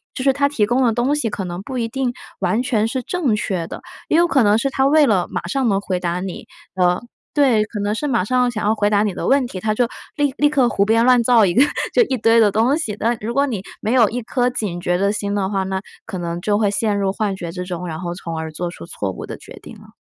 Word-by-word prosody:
就 255 - -3
是 270 0 +4
它 280 +1 +1
提 235 -8 +1
供 245 +4 +1
的 235 - +3
东 245 +6 +1
西 270 -6 -1
可 200 -2 -4
能 175 +1 -5
不 255 +5 -6
一 230 -2 -1
定 260 +1 -2 0.3
完 195 +6 0
全 225 -3 +1
是 255 +1 -3
正 300 -10 0
确 185 -5 -2
的， - - -8 0.3
也 - - +3
有 345 +1 +5
可 275 -5 +3
能 205 0 +4
是 275 +4 -1
它 265 +1 +2
为 305 +1 +5
了 200 -8 +2
马 - - -4
上 260 +7 0
能 195 -1 +2
回 190 -2 -2
答 175 0 -2
你， 185 -1 -6 0.3
呃 180 -1 +2 0.3
对， 255 -8 +3
可 210 -1 -6
能 205 +1 0
是 295 +7 -2
马 235 -8 +1
上 250 +4 +2
想 220 -3 -4
要 215 - +3
回 210 -1 +1
答 205 0 +3
你 205 - -1
的 - - -4
问 275 -1 +3
题， 190 -6 -6
它 215 +2 0
就 240 +2 +1 0.3
立 290 -3 +1
立 295 - +4
刻 270 -5 +2
胡 200 -4 +1
编 225 +2 +3
乱 250 -1 +5
造 230 -3 +5
一 175 - +1
个 255 - +6 0.3
就 485 - +5
一 270 - -1
堆 230 0 +4
的 215 - +5
东 230 +8 +2
西， 215 -11 -3
但 235 +2 0
如 230 +3 -4
果 280 +2 +3
你 225 -9 -3 0.2
没 215 - -1
有 240 -4 +5
一 245 +2 -3
颗 245 +2 0
警 205 -8 -3
觉 175 0 0
的 200 +2 +1
心 205 -1 -2
的 195 -2 0
话， 195 -1 0
那 190 0 -3 0.2
可 210 -4 -6
能 170 -1 -4
就 205 +2 +1
会 205 -2 +1
陷 210 0 0
入 195 -1 0
幻 200 0 -2
觉 170 -3 -6
之 180 0 -5
中， 180 -1 -5
然 160 -1 -5
后 175 -1 -4
从 165 -3 -6
而 160 -1 -5
做 175 +2 -4
出 - - -10
错 100 - -4
误 - - -7
的 - - -7
决 - - -13
定 - - -11
了。 - - -17
215 Hz, 305 characters per minute, -20 LUFS, 190-250 Hz, 0.3 s, 个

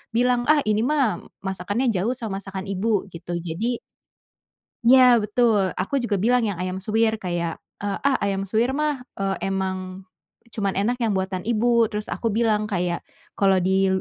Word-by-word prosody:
bilang, 245 +1 +2
"Ah, 300 -2 +5
ini 215 0 +2
mah 280 -7 +1 0.3
masakannya 200 +6 -1
jauh 210 +7 0
sama 215 -5 -4
masakan 195 -1 -6
Ibu." 200 0 -1
Gitu. 170 +1 -8
Jadi 195 +9 -2 1.1
iya 250 +1 +7
betul, 210 -3 +2
aku 190 +9 -1
juga 205 -4 0
bilang 245 +4 +3
yang 200 -5 -2
ayam 185 +1 -3
suwir 220 +2 +2
kayak, 175 -5 -3 0.2
eee, 200 -1 -2
"Ah, 275 -1 +2
ayam 195 -1 -1
suwir 225 +7 0
mah, 300 -2 0 0.2
eee, 195 0 -2
emang 190 -1 -3 0.5
cuman 200 -3 -2
enak 235 +6 0
yang 225 -4 +1
buatan 190 +1 -3
Ibu." 235 0 +3
Terus 210 0 -5
aku 230 - -2
bilang, 215 -2 +2
kayak 175 -4 -1 0.3
kalau 195 -2 +2
di, 190 +1 +3
205 Hz, 165 wpm, -23 LUFS, 190-235 Hz, 1.1 s, iya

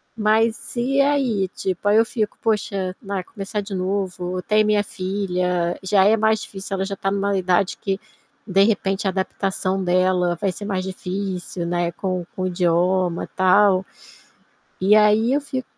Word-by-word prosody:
Mas 220 +2 +1
e 270 +3 +2
aí, 265 -9 +1
tipo, 190 +1 -3
aí 210 - +5
eu 225 - +5
fico: 220 -3 -3
"Poxa, 200 -4 -1
na 200 -3 -3
começar 205 +1 -5
de 200 0 -8
novo 185 -1 -2
tem 215 +2 +3
minha 210 -1 +2
filha, 180 -3 -2
já 190 0 +3
é 215 - +5
mais 220 0 +2
difícil. 195 0 -6
Ela 190 0 -1
já 200 - -4
está 195 - -2
em 195 - -1
uma 200 0 0
idade 185 +1 +1
que, 195 -1 -2 0.5
de 195 0 +4
repente, 200 -2 0
a - - +2
adaptação 190 0 -2
dela 180 -1 +2
vai 195 - +1
ser 205 +3 -8
mais 190 -2 -2
difícil, 185 -1 -4
né, 175 0 -1
com 185 -1 -3
com - - -5
o - - +1
idioma, 175 0 +1
tal". 185 0 +4 1.0
E 195 +3 +5
aí 215 +3 +4
eu 285 - +2
fico 260 -2 -4
195 Hz, 170 wpm, -22 LUFS, 185-210 Hz, 1.0 s, aí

